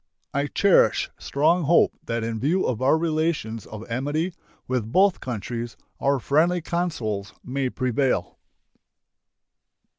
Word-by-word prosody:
I 140 +1 0
cherish 200 +6 +3
strong 160 +4 +2
hope 170 +4 +4
that 115 -1 -1
in 115 -1 -3
view 165 - +1
of 125 -1 -1
our 135 +4 +4
relations 155 -9 -1
of 110 +1 -9
amity 145 +9 -1 0.3
with 125 -4 -2
both 190 +4 +4
countries 115 0 -5 0.2
our 140 0 +2
friendly 160 +7 +2
counsels 125 - -3
may 130 0 -2
prevail. 125 -7 -1
135 Hz, 120 wpm, -24 LUFS, 115-165 Hz, 0.3 s, hope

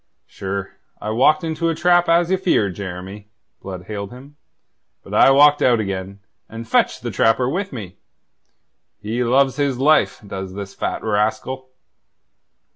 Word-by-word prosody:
"Sure, 100 0 -5 0.3
I 105 - -4
walked 135 +8 +3
into 165 +1 -1
a 165 - -1
trap, 175 +1 +3
as 170 +1 +3
ye - - +4
feared, 110 - +1
Jeremy," 95 +2 -8 0.3
Blood 95 -2 -7
hailed 100 0 -6
him. 135 +4 -13 0.7
"But - - -11
I - - +6
walked 145 +2 +5
out 120 -2 +4
again, 100 -1 -5 0.3
and 115 +1 -8
fetched - - +1
the - - -3
trapper 115 +3 +2
with 185 +8 -2
me. 105 -9 -8 1.0
He 110 +4 -2
loves 135 +2 +2
his 140 -3 0
life, 150 +4 +3
does 95 -1 -6
this 100 -1 -7
fat - - -4
rascal." 110 +5 -1
115 Hz, 150 wpm, -20 LUFS, 100-145 Hz, 1.0 s, I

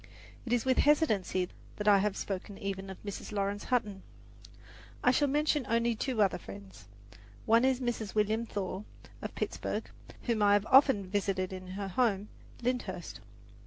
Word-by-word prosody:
It - - -3
is 245 0 +1
with 260 -1 +3
hesitancy 215 - +3 0.3
that 210 - -4
I 200 -1 +7
have 205 0 0
spoken 195 0 -4
even 195 -1 -4
of 190 - -7
Mrs. 200 0 -6
Laurence 200 0 -2
Hutton. 210 -6 0 1.0
I 250 - +6
shall 290 +3 +3
mention 295 +1 +2
only 235 +1 +2
two 230 -1 +1
other 195 -2 +1
friends. 100 - -11 0.6
One 230 +2 +5
is 260 -1 +3
Mrs. 235 -5 -3
William 215 +2 +1
Thaw, 195 -2 -3 0.4
of - - -6
Pittsburgh, - - -3 0.4
whom 230 -3 0
I 205 0 +5
have 205 0 +3
often 270 -7 +6
visited 190 -1 -1
in 185 0 -7
her 200 0 -4
home, 205 -1 +1 0.3
Lyndhurst. 220 -8 -3
205 Hz, 160 wpm, -31 LUFS, 195-240 Hz, 1.0 s, I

